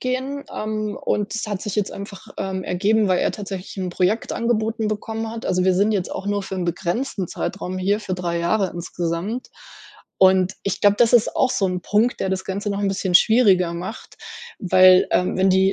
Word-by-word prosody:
gehen. 260 +2 -3
Ähm, 215 -1 -3
und 210 +1 -1
das 220 - -3
hat 205 -3 -4
sich 210 0 -4
jetzt 205 -2 0
einfach, 200 0 -9
ähm, 190 -1 -3
ergeben, 205 +4 +1
weil 185 - +2
er - - +1
tatsächlich 195 -2 -7
'n 185 -1 -2
Projekt 185 +5 0
angeboten 225 -1 0
bekommen 220 +1 -3
hat. 230 0 -6
Also, 185 -1 +1
wir 190 - +4
sind 205 +3 +2
jetzt 190 -3 -1
auch 200 - -5
nur 205 -1 0
für 190 - -6
'n 180 -2 -2
begrenzten 185 +4 -2
Zeitraum 185 +1 -4
hier, 200 +3 +1
für 190 -3 -5
3 175 -2 -2
Jahre 185 +3 +1
insgesamt. 175 +6 -4 0.7
Und 190 0 +4
ich 200 - -2
glaube, 205 0 +5
das 240 0 +4
ist 235 -2 +4
auch 255 - +2
so 195 -6 +1
'n 180 -1 -2
Punkt, 215 +7 +1
der - - 0
das 190 0 -2
Ganze 200 +2 -3
noch 200 0 -2
'n 200 - +1
bisschen 190 -1 -2
schwieriger 190 -4 +5
macht, 180 +8 -7 0.4
weil, 185 0 +6
ähm, 180 0 +1
wenn 190 +1 +4
die 190 +1 +3
195 Hz, 205 wpm, -22 LUFS, 185-215 Hz, 0.7 s, weil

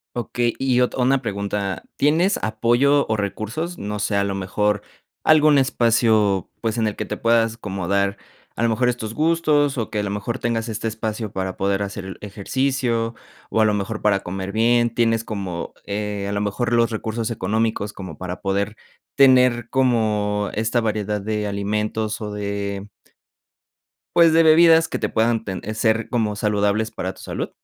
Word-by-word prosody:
Okey. 120 -1 -1
Y 130 -2 +1
ot 125 - +1
una 130 +1 +2
pregunta, 100 -3 -3
¿tienes 165 +7 +2
apoyo 120 +6 +2
o 110 0 0
recursos?, 115 - -3
no 105 0 -4
sé, 105 - -1
a 100 - +2
lo 100 - -2
mejor, 105 +2 0 0.4
algún 155 -1 +5
espacio, 110 - +2
pues, 115 0 -1
en 110 -2 +1
el 105 - -3
que - - -4
te - - -5
puedas 115 -1 +2
como 95 -5 -5
dar, 100 0 +1 0.4
a 115 - -2
lo 115 - +3
mejor 125 +2 +2
estos 110 -3 -3
gustos 150 -2 +2
o 115 - -3
que 105 - -1
a - - 0
lo 105 - -2
mejor 105 +3 -3
tengas 115 0 -1
este 110 +1 -3
espacio 110 -1 -4
para 95 -1 -3
poder 100 +1 0
hacer 100 -1 -6
el 95 - -7
ejercicio, 115 +3 -1 0.4
o 110 - +2
a - - +5
lo 105 -1 +2
mejor 105 +2 -3
para 100 -2 +2
comer 95 +2 -5
bien, 120 +2 +3
¿tienes 115 -1 +2
como, 95 -6 -5
eh, 105 -1 -3
a 100 - -3
lo 100 - -1
mejor 120 +4 -1
los 115 0 +3
recursos 110 0 -3
económicos 110 0 -1
como 90 -6 -8
para 90 -1 -6
poder 100 +2 -1 0.4
tener 125 -3 +5
como 105 -5 +1
esta 115 +2 0
variedad 105 -1 -1
de 105 +1 -2
alimentos 105 +2 -2
o 105 -1 -4
de 100 -1 -4 1.3
pues, 170 -2 +6
de 165 0 +6
bebidas 165 +1 +6
que - - -4
te - - -1
puedan 115 0 +1
ten 95 -2 -5
ser 110 0 +1
como 110 -4 0
saludables 105 +1 0
para 95 -4 -4
tu - - -15
salud? - - -4
110 Hz, 180 wpm, -22 LUFS, 100-120 Hz, 1.3 s, pues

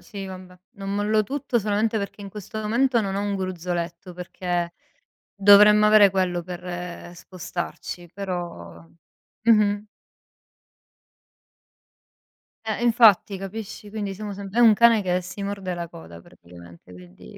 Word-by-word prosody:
sì, 195 +2 -8
vabbè! 185 -1 -11 0.2
Non 195 0 -5
mollo 210 +1 +1
tutto 265 +2 -2
solamente 215 +1 0
perché 200 0 -6
in 200 - -7
questo 210 +2 -8
momento 235 +3 +1
non 195 -2 -3
ho 200 - -1
un 205 0 -2
gruzzoletto, 180 -1 -4
perché 175 -1 -3 0.6
dovremmo 210 +1 +7
avere 210 -2 +7
quello 180 -2 -1
per 175 0 -7
spostarci, 175 0 -7
però 170 - -6 0.6
mh-mh. 210 -2 +3 2.8
Eh, 220 +1 -3
infatti, 225 -5 +4
capisci, 205 +2 -8
quindi 205 -2 -4
siamo 210 +1 -7
sem 195 0 -7
è 235 - +1
un 230 -2 +7
cane 230 0 +5
che 180 -2 0
si 180 +3 -8
morde 195 -2 -4
la 170 -1 -6
coda 85 - -12
praticamente, 85 +1 -16
quindi, 90 -8 -14
195 Hz, 130 wpm, -24 LUFS, 175-210 Hz, 2.8 s, dovremmo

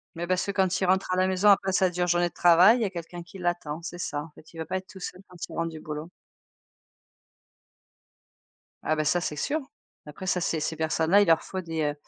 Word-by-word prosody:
Mais, 175 +1 -4
parce 185 0 0
que 200 - -2
quand 190 -1 +1
il - - +2
rentre 190 +1 +1
à - - +2
la 185 - +3
maison 190 +2 +1
après 195 -1 +4
sa 185 -1 +3
dure 180 0 -1
journée 175 0 +2
de 170 - -11
travail, 180 +9 +6
il - - -3
y - - +2
a 195 - -1
quelqu'un 175 -1 -8
qui 185 +3 -13
l'attend, 175 -3 -3
c'est 175 +1 -7
ça. 145 -4 -3
En 165 - -12
fait, 155 - -17
il - - -12
veut 160 - -3
pas 185 - -4
être 185 - -8
tout 190 - -12
seul 185 0 -7
quand 180 - -14
il - - -12
rentre 165 0 -1
du 160 -1 -9
boulot. 155 +2 -7 2.7
Ah 155 - +1
bah 155 - -1
ça, 175 +4 +2
c'est 150 - -3
sûr. 295 - -1 0.5
Après 170 +6 -8
ça 180 -1 0
ces 165 -1 0
ces 155 +1 -2
personnes 160 0 -1
là, 200 +1 +7
il 205 - +2
leur 165 -1 +4
faut 190 - -5
des, 165 -2 -3
heu, 145 -1 0
175 Hz, 260 wpm, -26 LUFS, 160-185 Hz, 2.7 s, là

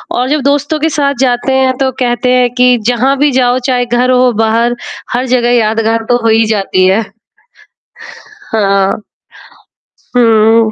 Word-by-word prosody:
और 250 +1 -1
जब 300 -1 0
दोस्तों 290 +2 0
के 320 +2 0
साथ 280 -2 -1
जाते 255 0 0
हैं। 265 -1 +1
तो 265 -1 0
कहते 250 0 0
हैं 250 -1 +2
कि 250 -1 +3
जहाँ 250 +3 +1
भी 290 0 +2
जाओ 250 0 +1
चाहे 250 -1 0
घर 245 +1 0
हो, 250 -1 +3
बाहर 225 +2 0 0.4
हर 250 +2 -1
जगह 245 -1 +1
यादगार 225 0 0
तो 245 - +3
हो - - +1
ही 225 0 +3
जाती 195 -3 0
है। 195 +4 +2 1.5
हाँ, 195 -2 +1 1.3
हुँ 225 -1 +3
245 Hz, 155 wpm, -11 LUFS, 225-260 Hz, 1.5 s, कि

